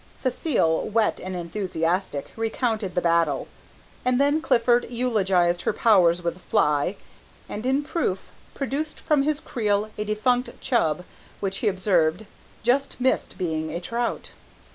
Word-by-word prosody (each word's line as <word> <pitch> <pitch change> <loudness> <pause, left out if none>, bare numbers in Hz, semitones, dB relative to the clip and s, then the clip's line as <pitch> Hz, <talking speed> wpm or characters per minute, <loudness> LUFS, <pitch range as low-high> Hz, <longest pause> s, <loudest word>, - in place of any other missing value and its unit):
Cécile, 240 - 0
wet 220 0 +2
and 185 0 -5
enthusiastic, 175 -3 -2
recounted 225 -3 -1
the 180 - +2
battle, 165 -4 +2 0.6
and 250 0 +2
then 285 +3 +3
Clifford 240 -3 +3
eulogized 195 -8 +1
her - - 0
powers 180 -6 +4
with 170 - 0
the 185 - -17
fly, 165 -3 +1 0.5
and, 215 +4 -4
in 270 +3 +2
proof, 285 - -2 0.2
produced 280 +3 -3
from 300 -2 +2
his 300 +1 0
creel 215 -6 -1
a - - +1
defunct 245 +4 0
chub, 180 - +1 0.4
which, 195 -1 -2
he 225 - 0
observed, 185 -1 +2 0.4
just 265 +4 +1
missed 260 +1 0
being 160 -3 -2
a 170 - -3
trout. 235 +6 -3
210 Hz, 140 wpm, -25 LUFS, 175-245 Hz, 0.6 s, powers